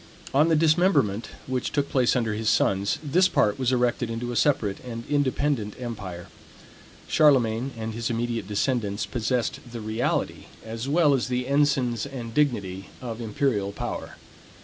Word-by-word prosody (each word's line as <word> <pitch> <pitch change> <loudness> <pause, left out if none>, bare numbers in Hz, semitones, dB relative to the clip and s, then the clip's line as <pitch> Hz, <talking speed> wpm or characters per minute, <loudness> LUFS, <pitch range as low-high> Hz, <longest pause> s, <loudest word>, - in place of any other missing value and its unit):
On 145 +4 +5
the 165 - +4
dismemberment, 155 - +3 0.2
which 130 -1 -2
took 145 -1 0
place 125 -3 +3
under 115 -3 0
his 110 +1 0
sons, 100 +10 +2
this 175 +6 +4
part 105 - +1
was 130 -1 +1
erected 125 -1 +1
into 120 +2 -3
a - - -4
separate 115 -8 +1
and 115 -2 -7
independent 140 -6 0
empire. 100 -8 -6 0.8
Charlemagne 130 -4 +3
and 110 0 -4
his 115 0 -3
immediate 115 -3 -2
descendants 105 -1 -1
possessed 120 0 -1
the 120 - -6
reality, 110 +2 -2 0.2
as 115 +4 -5
well 150 -1 +4
as 130 -3 0
the 125 0 -1
ensigns 140 -3 +1
and 120 -4 -7
dignity 100 -10 0
of 120 -2 -6
imperial 110 -3 0
power. - - -5
120 Hz, 150 wpm, -25 LUFS, 110-140 Hz, 0.8 s, On